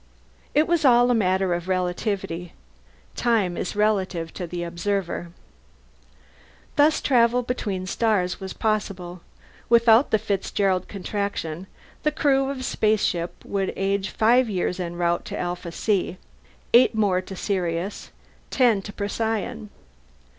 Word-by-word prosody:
It 305 +2 +4
was 340 -2 +1
all 245 -2 +5
a - - +4
matter 190 -4 +2
of 175 +1 -3
relativity. 180 -1 -2 0.6
Time 215 -7 +1
is 180 - -4
relative 190 -6 0
to 180 - -5
the 175 +1 -4
observer. 175 0 -2 1.5
Thus 300 +2 +4
travel 245 -1 +3
between 215 -6 -3
the 185 - -7
stars 195 -4 0
was 190 -1 -6
possible. 190 -5 -2 0.5
Without 230 +2 +5
the 220 - +3
Fitzgerald 195 -2 -1
Contraction, 195 -4 -4 0.3
the 300 - +1
crew 275 -3 +2
of 275 -2 -4
a - - -5
spaceship 210 -7 0
would 195 -1 -2
age 195 0 -1
five 240 +2 +3
years 180 -2 -1
en 175 -1 -4
route 175 0 0
to - - -5
Alpha 175 -1 -4
C, 185 -1 -1 0.6
eight 240 -1 +6
to 190 -2 0
Sirius, 180 -1 -2 0.4
ten 240 -6 +3
to 205 - -8
Procyon. 220 +1 -3
200 Hz, 130 wpm, -24 LUFS, 180-225 Hz, 1.5 s, eight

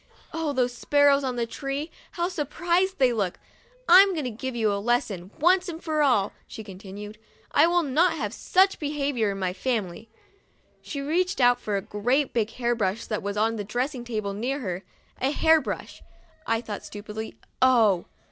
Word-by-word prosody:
Oh, 325 -2 -1
those 250 -3 0
sparrows 285 +2 +3
on 255 -2 -2
the 235 -1 -1
tree! 275 +6 -4 0.2
How 345 0 -1
surprised 350 +3 0
they 255 -3 +3
looked! 200 -6 -1 0.3
" - - -31
I'm 380 +3 +8
going 310 -4 -2
to 250 - -3
give 255 +3 -5
you 220 -3 +1
a 200 - -2
lesson, 205 -6 -1
once 365 +3 +3
for 310 -2 -1
all," 240 -9 +2
she 220 - -8
continued; 205 +2 -9 0.2
" - - -31
I - - +5
will 350 0 +2
not 320 +5 +2
have 220 -10 -3
such 380 +7 +2
behavior 285 -7 -1
in 195 - -3
my 185 -2 -1
family." 220 -1 -3 0.7
She 280 - -5
reached 355 +6 0
out 245 -1 +5
for 210 -4 -2
a 195 - -4
great 250 +7 0
big 225 -3 +1
hair 240 +1 -1
brush 210 -1 -1
that 215 - -3
was 200 +1 -4
on 225 +1 +1
a - - -2
dressing 245 +5 -3
table 215 -4 -3
near 255 +7 -2
her. 185 -4 -4 0.2
" - - -31
A 265 - +2
hair 320 +2 +4
brush," - - -6 0.5
I 225 0 +1
thought, 215 -3 -6
stupidly. 210 +1 -7 0.3
Oh! 225 -8 +4
245 Hz, 190 wpm, -26 LUFS, 210-295 Hz, 0.7 s, I'm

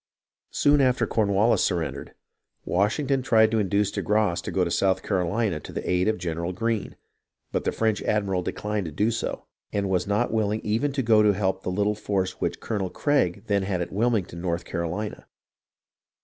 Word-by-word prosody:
Soon 145 0 +3
after 130 -1 +3
Cornwallis 105 +1 +2
surrendered, 80 -7 -2 0.5
Washington 130 +8 +1
tried 110 -3 +4
to 115 - +2
induce 100 0 +1
de - - -3
Grasse 105 -4 +1
to - - -5
go 95 - +1
to 85 - -1
South 95 +1 +1
Carolina 95 -1 0
to - - -10
the - - -5
aid 90 +1 +2
of 110 0 +1
General 85 +1 -3
Greene; 115 +2 -2 0.6
but - - -2
the - - +2
French 110 -2 0
admiral 100 -3 0
declined 105 +2 -3
to - - -6
do 105 +10 +1
so, 115 - -3 0.3
and 100 -2 -1
was 90 0 +1
not 105 +2 0
willing 110 -1 0
even 115 +7 0
to 135 -1 -1
go 110 -2 +5
to 105 -1 +4
help 95 -1 0
the - - -3
little 100 +3 +1
force 100 -3 -2
which - - -1
Colonel 100 -5 -2
Craig 100 - 0
then 100 -2 +1
had 95 -1 -1
at 85 - -3
Wilmington, 105 -6 0
North 85 -1 -2
Caro 85 -1 -3
lina. 105 0 -6
100 Hz, 190 wpm, -25 LUFS, 90-110 Hz, 0.6 s, go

